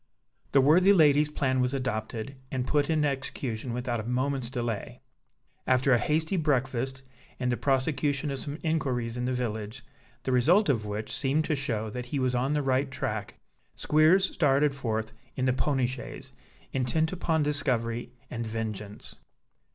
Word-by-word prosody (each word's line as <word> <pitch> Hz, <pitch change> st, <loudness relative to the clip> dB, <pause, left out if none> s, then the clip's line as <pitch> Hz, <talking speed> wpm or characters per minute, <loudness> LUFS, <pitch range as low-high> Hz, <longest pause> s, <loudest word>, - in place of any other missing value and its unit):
The 135 Hz, -, +5 dB
worthy 180 Hz, +8 st, +6 dB
lady's 150 Hz, -4 st, +5 dB
plan 130 Hz, -3 st, 0 dB
was 125 Hz, +2 st, +1 dB
adopted 115 Hz, 0 st, -3 dB
and 130 Hz, -2 st, -2 dB
put 145 Hz, +1 st, +1 dB
in 155 Hz, -2 st, +2 dB
execution 130 Hz, -3 st, -3 dB
without 120 Hz, 0 st, -2 dB
a -, -, -4 dB
moment's 130 Hz, +1 st, -1 dB
delay. 120 Hz, -1 st, -4 dB, 0.7 s
After 130 Hz, +1 st, +4 dB
a 120 Hz, -, +4 dB
hasty 160 Hz, -, 0 dB
breakfast, 135 Hz, -3 st, 0 dB, 0.4 s
and 125 Hz, -1 st, 0 dB
the -, -, +1 dB
prosecution 140 Hz, +2 st, 0 dB
of 135 Hz, -, -2 dB
some 145 Hz, +2 st, -4 dB
inquiries 130 Hz, -8 st, -1 dB
in 125 Hz, 0 st, -2 dB
the 130 Hz, -, 0 dB
village, 115 Hz, 0 st, -4 dB, 0.4 s
the 130 Hz, -, -1 dB
result 165 Hz, -, +4 dB
of 110 Hz, -6 st, +1 dB
which 105 Hz, +4 st, -4 dB
seemed 145 Hz, +3 st, +1 dB
to 155 Hz, -, 0 dB
show 115 Hz, -6 st, -1 dB
that 125 Hz, +2 st, -5 dB
he 140 Hz, -, -3 dB
was 130 Hz, -1 st, +1 dB
on 130 Hz, +4 st, +1 dB
the 150 Hz, -1 st, 0 dB
right 135 Hz, +1 st, +1 dB
track, -, -, -4 dB, 0.4 s
Squeers 160 Hz, +5 st, +4 dB
started 145 Hz, -2 st, +3 dB
forth 110 Hz, -5 st, -3 dB, 0.2 s
in 130 Hz, -, -1 dB
the 130 Hz, -, +3 dB
pony 135 Hz, 0 st, +1 dB
chaise, 130 Hz, +1 st, -7 dB, 0.4 s
intent 135 Hz, +5 st, +1 dB
upon 165 Hz, -3 st, 0 dB
discovery 120 Hz, -5 st, -1 dB, 0.2 s
and 115 Hz, -2 st, -3 dB
vengeance. 110 Hz, -2 st, -5 dB
130 Hz, 160 wpm, -28 LUFS, 120-145 Hz, 0.7 s, worthy